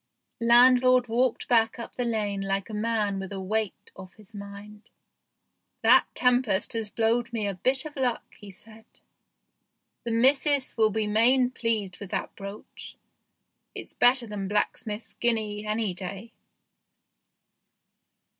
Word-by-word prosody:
Landlord 250 +1 +5
walked 240 +1 0
back 225 -1 +2
up 235 - -8
the 245 - -3
lane 210 -4 -2
like 195 +2 -3
a - - -8
man 210 -2 -1
with 195 0 -7
a 195 - -5
weight 210 +2 -3
off 190 -1 -12
his 215 0 -18
mind. 205 +1 -11 0.4
" - - -53
That - - +5
tempest 245 -6 +2
has 225 -2 -3
blowed 235 +2 0
me 225 -3 -2
a 200 - -2
bit 260 - -1
of 305 - -8
luck," 255 -4 -1
he 205 - -13
said; 220 +3 -14 0.6
" - - -53
the 235 - -4
missus 270 +4 +2
will 220 -1 +3
be 215 +1 -1
main 245 +4 +3
pleased 220 -7 -2
with 200 - -8
that - - -4
brooch. 200 +1 -10 0.8
It's - - -6
better 245 0 +3
than 205 -3 -5
blacksmith's 210 +2 -3
guinea, 215 -3 -2
any 215 -2 -1
day." 195 +5 -7
220 Hz, 145 wpm, -26 LUFS, 205-240 Hz, 0.8 s, Landlord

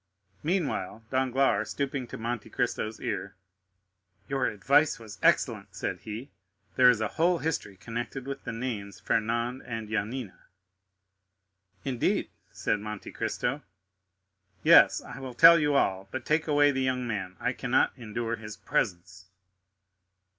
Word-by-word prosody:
Meanwhile, 150 - -1
Danglars, 130 -4 +2
stooping 140 -2 -2
to - - -7
Monte 115 -1 -4
Cristo's 110 +1 -2
ear, - - -4 0.9
"Your 135 -1 0
advice 140 +9 +3
was 110 -2 -11
excellent," - - +2
said - - -3
he; 110 +6 -7 0.4
"there 125 -1 +7
is 120 -3 +3
a 110 - +1
whole 175 +2 +4
history 155 - -3
connected 120 +5 -5
with 135 0 -6
the - - -4
names 110 -5 -5
Fernand 115 +5 0
and 115 -3 -6
Yanina." 110 0 -3 1.5
"Indeed?" 130 -3 0 0.2
said 105 - -1
Monte 105 -1 -7
Cristo. - - -2 1.0
"Yes, - - +7
I - - -9
will 130 -2 -7
tell 165 +4 +9
you 145 -1 +2
all; 95 -7 +1
but 130 +2 -5
take 155 +1 +1
away 145 -1 +4
the 135 -1 -1
young 130 -1 0
man; 95 -5 -4
I 125 - 0
cannot 125 0 +2
endure 115 -1 -3
his 105 -1 -9
presence." 95 +1 -2
120 Hz, 135 wpm, -28 LUFS, 105-135 Hz, 1.5 s, tell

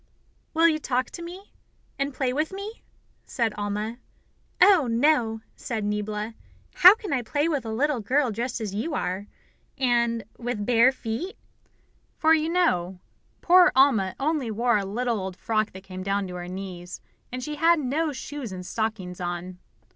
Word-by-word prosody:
"Will 330 +1 +6
you 310 -2 +2
talk 255 -3 -1
to 345 - -8
me, 360 +4 -9 0.5
and 275 +1 0
play 255 -2 -1
with 305 +3 -1
me?" 400 +4 -7 0.4
said 230 -3 -1
Alma. 210 +3 -3 0.6
"Oh, 360 -10 +6
no," 230 -2 +2
said 225 -4 -4
Niebla; 210 +1 -2 0.4
"how 365 +3 +10
can 420 -8 -5
I 260 - +1
play 290 +6 0
with 285 -8 -1
a - - -3
little 275 +4 +1
girl 255 +4 +1
dressed 240 +4 -3
as 210 -3 -4
you 260 +10 -2
are, 190 +3 -3 0.5
and 235 -3 +1 0.2
with 235 -4 -3
bare 245 +2 +5
feet?" 260 - -5 0.8
For, 320 0 +4
you 315 0 +2
know, 190 - +1 0.4
poor 360 +1 +6
Alma 230 -9 +4
only 285 -3 0
wore 230 0 +2
a 200 - -3
little 230 +3 -1
old 190 -1 -5
frock 215 -1 0
that 190 0 -10
came 185 -1 -8
down 195 +1 -1
to - - -7
her 175 0 -6
knees, 180 -1 -7 0.3
and 255 0 -5
she 300 +2 -5
had 335 +2 +5
no 300 +4 0
shoes 275 -3 -6
and 180 -1 -7
stockings 190 -4 -3
on. 175 +1 -4
235 Hz, 170 wpm, -25 LUFS, 205-295 Hz, 0.8 s, how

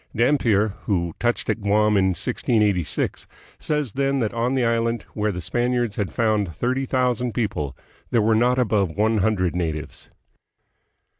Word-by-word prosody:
Dampier, 115 -4 +3 0.2
who 85 -5 0
touched 120 0 0
at 110 - -1
Guam 105 +1 +3
in 95 -1 +3
1686, 100 - 0 0.3
says 150 -6 -1
then 140 0 0
that 115 -3 -1
on 120 +3 0
the 130 -2 +2
island, 115 0 0
where 105 0 0
the 90 -2 -6
Spaniards 120 +3 0
had 100 -3 -2
found 105 -7 0
thirty 130 +2 -1
thousand 125 -3 0
people, 75 - -2 0.3
there 120 - +2
were 110 +1 +3
not 120 +3 +3
above 100 -8 +1
one 110 +1 +2
hundred 95 -4 +1
natives. 80 -4 -4
110 Hz, 150 wpm, -23 LUFS, 100-120 Hz, 0.3 s, Dampier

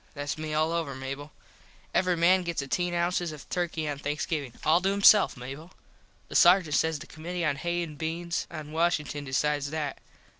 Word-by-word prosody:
Thats 145 0 -3
me 155 0 -5
all 155 +1 +1
over, 165 -5 -2
Mable. 135 +3 -6 0.6
Every 180 -1 +2
man 180 +3 +5
gets 170 -5 -2
ateen 175 +6 -1
ounces 175 0 0
of 150 -2 -10
Turky 170 -3 -2
on 145 -1 -3
Thanksgivin. 145 -2 -3
All 160 +3 +4
to 190 - +1
himself, 200 -2 +5
Mable. 135 +8 -9 0.5
The - - -10
sargent 175 -3 +6
says 160 +1 +2
the - - -10
commitee 170 +1 -4
on 140 - +1
Hays 175 +3 -1
and 150 -2 -12
Beans 170 +2 -3
at 155 -2 -7
Washington 150 -2 -1
decides 145 +2 0
that. 150 -2 -3
160 Hz, 180 wpm, -28 LUFS, 145-175 Hz, 0.6 s, sargent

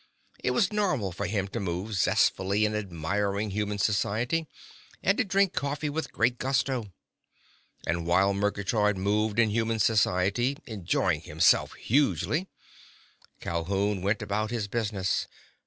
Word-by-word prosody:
It - - +1
was 210 -3 +1
normal 150 - 0
for 90 - -3
him 100 0 -1
to 115 - -4
move 95 +2 -3
zestfully 100 +2 +2
in 105 - -1
admiring 100 +2 -2
human 105 0 -2
society, 110 +10 0 0.6
and 195 - +3
to - - +4
drink 195 -2 +2
coffee 145 +1 -2
with 160 +2 -3
great 120 +2 +1
gusto. 130 -5 -1 0.9
And 85 0 -1
while 95 +3 +3
Murgatroyd 105 +1 0
moved 105 +3 0
in 110 -2 +4
human 115 +1 0
society, 110 +4 +2
enjoying 95 -6 0
himself 80 0 +3
hugely, 150 - +1 0.9
Calhoun 95 +4 -1
went 100 +2 0
about 105 +1 -1
his 115 -3 -2
business. 100 -4 -1
105 Hz, 130 wpm, -28 LUFS, 95-120 Hz, 0.9 s, to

